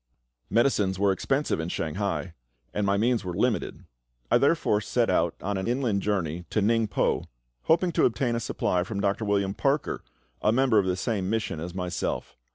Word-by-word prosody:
Medicines 105 -6 +2
were 100 0 +3
expensive 135 - 0
in 80 +1 -3
Shanghai, 90 +2 -2 0.4
and 105 -1 0
my 100 0 +2
means 115 +2 +1
were 90 -2 -4
limited. 115 +3 -1 0.5
I - - +6
therefore 140 -8 +2
set - - +1
out - - +1
on 100 +1 -1
an 95 - -3
inland 120 -5 0
journey 90 -5 -1
to - - 0
Ningpo, 110 0 +1 0.4
hoping 170 +2 +3
to - - +3
obtain 120 +1 +1
a - - 0
supply 90 -5 0
from 100 +2 -4
Dr. 100 +2 0
William 100 -1 +1
Parker, 140 +6 0 0.4
a 105 - +3
member 125 -2 +4
of 95 - 0
the 90 0 0
same 95 -2 -1
mission 110 -7 -1
as 85 +2 -6
myself. 90 -1 -3
100 Hz, 175 wpm, -27 LUFS, 95-115 Hz, 0.5 s, I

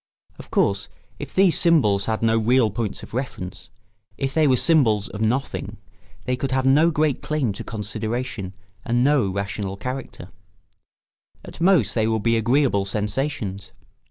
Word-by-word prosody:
Of - - -11
course, 100 -1 +1 0.3
if - - -7
these 190 -3 +3
symbols 110 - +3
had 110 0 -2
no 115 0 +3
real 115 0 +3
points 110 0 -4
of - - -12
reference, 115 -8 -5 0.5
if 135 -1 -2
they 155 -2 +3
were 130 -2 +4
symbols 115 - +3
of 105 - -7
nothing, 125 +5 -2 0.5
they 125 0 0
could 135 +1 -3
have 130 0 0
no 145 +5 +5
great 155 -3 0
claim 145 -9 -1
to - - -7
consideration 110 -2 -4 0.3
and 120 +1 +1
no 135 -7 +3
rational 100 0 -4
character; 125 -5 -6 1.2
at - - -11
most 170 - +3
they 110 -2 +1
would 110 -2 0
be 115 0 +3
agreeable 115 -2 +2
sensations. 105 -1 -3
115 Hz, 155 wpm, -23 LUFS, 105-135 Hz, 1.2 s, no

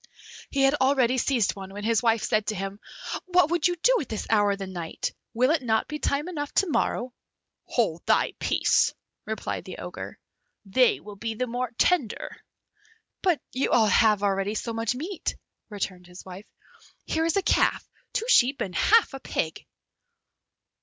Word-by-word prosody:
He 275 -1 +1
had 270 +1 +5
already 260 -2 +3
seized 240 -6 +1
one, 195 -1 -8
when 205 +1 -7
his 225 0 +2
wife 230 -2 +2
said 215 -1 +1
to 215 - -1
him, 195 +1 -5 0.5
"What 360 -2 +3
would 345 -1 +3
you 355 - -1
do - - +3
at - - -7
this 220 - -4
hour 205 -2 +4
of - - -5
the 195 - -5
night? 175 -3 -5 0.2
will 255 +4 +3
it 320 -3 +2
not 220 -3 +1
be 300 0 -5
time 290 +3 -1
enough 290 -5 -4
to - - +4
morrow?" 255 -5 -1 0.5
"Hold 175 -9 0
thy - - +3
peace," - - +2 0.3
replied - - -3
the - - -8
Ogre, - - -7 0.5
"they 245 +5 +3
will 205 -1 -11
be 225 +2 -4
the 255 - -1
more 245 +1 -3
tender." 305 - +1 0.9
"But 360 -5 +2
you 260 - -1
have 215 -2 +4
already 195 +1 0
so 230 +1 -3
much 225 +2 -1
meat," 330 +7 -4 0.3
returned 185 -4 -5
his 180 +1 -12
wife; 190 +2 -10 0.6
"Here 320 0 0
is 335 - +1
a 395 - +1
calf, - - +2 0.2
two 455 - -2
sheep, 270 - +4
and 185 - -3
half 440 - +4
a 270 - -6
pig." - - -3
235 Hz, 175 wpm, -26 LUFS, 205-290 Hz, 0.9 s, had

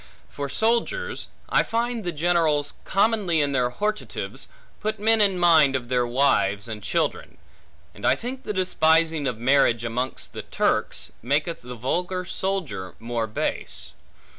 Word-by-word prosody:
For 140 -1 -5
soldiers, 235 - 0 0.2
I - - +4
find 235 0 -1
the 175 - -2
generals 155 -3 +1
commonly 200 -4 +2
in 145 -1 +1
their 125 -2 +1
hortatives, 210 +11 -4 0.3
put 215 0 -2
men 220 +1 +4
in 195 -3 +3
mind 160 -6 +5
of 120 -2 -3
their 125 -1 +1
wives 120 -5 +2
and 110 -2 -6
children; - - -2 0.6
and - - -14
I - - +4
think 255 +3 -6
the - - -4
despising 160 -5 +2
of 125 -4 -2
marriage 120 -1 +3
amongst 125 +3 -3
the - - -5
Turks, - - -1
maketh 145 +7 0
the 125 0 -8
vulgar 180 +9 -2
soldier 180 - -3
more 115 0 -2
base. 110 - -4
160 Hz, 145 wpm, -24 LUFS, 125-195 Hz, 0.6 s, mind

